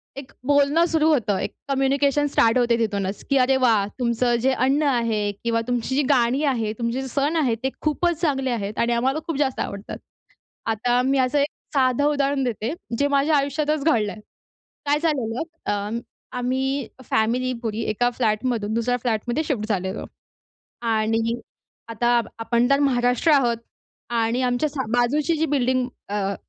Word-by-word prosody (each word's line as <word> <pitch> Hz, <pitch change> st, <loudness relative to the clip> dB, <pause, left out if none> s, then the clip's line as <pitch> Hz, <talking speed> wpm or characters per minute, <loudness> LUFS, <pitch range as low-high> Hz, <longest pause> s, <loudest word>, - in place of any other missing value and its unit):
एक 275 Hz, -1 st, -9 dB, 0.2 s
बोलणं 290 Hz, +3 st, +4 dB
सुरु 320 Hz, -2 st, +2 dB
होतं. 230 Hz, -10 st, +2 dB
एक -, -, -3 dB, 0.2 s
कम्युनिकेशन 275 Hz, +1 st, +2 dB
स्टार्ट 230 Hz, -4 st, +3 dB
होते 240 Hz, -1 st, +3 dB
तिथूनच, 200 Hz, -3 st, -2 dB
की 275 Hz, -, +3 dB
अरे 265 Hz, +1 st, +3 dB
वाह! 230 Hz, -6 st, +3 dB
तुमचं 240 Hz, 0 st, +1 dB
जे 265 Hz, +2 st, +3 dB
अन्न 270 Hz, +4 st, +2 dB
आहे 225 Hz, -5 st, +1 dB
किंवा 230 Hz, -1 st, +1 dB
तुमची 245 Hz, +1 st, -1 dB
जी 290 Hz, -, +3 dB
गाणी 260 Hz, +1 st, +3 dB
आहे, 235 Hz, -7 st, 0 dB
तुमचे 235 Hz, +3 st, -1 dB
जे 265 Hz, -, -5 dB
सण 280 Hz, +5 st, 0 dB
आहेत 250 Hz, -7 st, +1 dB
ते 265 Hz, -, +1 dB
खूपच 325 Hz, +2 st, 0 dB
चांगले 270 Hz, -5 st, 0 dB
आहेत 210 Hz, -2 st, -3 dB
आणि 235 Hz, +1 st, +2 dB
आम्हाला 265 Hz, +6 st, +1 dB
खूप 330 Hz, -, -2 dB
जास्त 265 Hz, -3 st, 0 dB
आवडतात. 200 Hz, +1 st, -5 dB, 0.7 s
आता 240 Hz, +3 st, +1 dB
मी 270 Hz, +1 st, +2 dB
असं 260 Hz, +3 st, +2 dB
एक 285 Hz, -, +2 dB, 0.3 s
साधं 260 Hz, 0 st, +2 dB
उदाहरण 280 Hz, -1 st, 0 dB
देते 235 Hz, +1 st, -2 dB, 0.2 s
जे 285 Hz, -, +2 dB
माझ्या 285 Hz, +2 st, +2 dB
आयुष्यातच 290 Hz, +1 st, 0 dB
घडलंय. 220 Hz, -9 st, +1 dB, 0.7 s
काय 290 Hz, +1 st, +2 dB
झालेलं 265 Hz, -8 st, -1 dB, 0.3 s
अं, 205 Hz, +3 st, -2 dB, 0.4 s
आम्ही 260 Hz, +1 st, -1 dB, 0.2 s
फॅमिली 245 Hz, +4 st, +1 dB
पुरी 220 Hz, 0 st, -2 dB
एका 245 Hz, +3 st, +1 dB
फ्लॅट 225 Hz, -2 st, 0 dB
मधून 220 Hz, -4 st, -1 dB
दुसऱ्या 240 Hz, +2 st, 0 dB
फ्लॅटमध्ये 240 Hz, +4 st, -1 dB
शिफ्ट 235 Hz, -8 st, -2 dB
झालेलो 190 Hz, -1 st, -2 dB, 0.8 s
आणि 225 Hz, +1 st, +1 dB, 0.5 s
आता 240 Hz, +1 st, +2 dB, 0.2 s
आपण 235 Hz, +1 st, +1 dB
तर 275 Hz, -, +5 dB
महाराष्ट्र 250 Hz, +1 st, +2 dB
आहोत 245 Hz, -5 st, +3 dB, 0.5 s
आणि 235 Hz, +1 st, 0 dB
आमच्या 250 Hz, +4 st, +1 dB
सा 280 Hz, -2 st, -3 dB
बाजूची 280 Hz, +7 st, +2 dB
जी 320 Hz, +1 st, +1 dB
बिल्डिंग 255 Hz, -3 st, +1 dB, 0.2 s
अ, 200 Hz, -1 st, -1 dB
250 Hz, 160 wpm, -23 LUFS, 230-280 Hz, 0.8 s, तर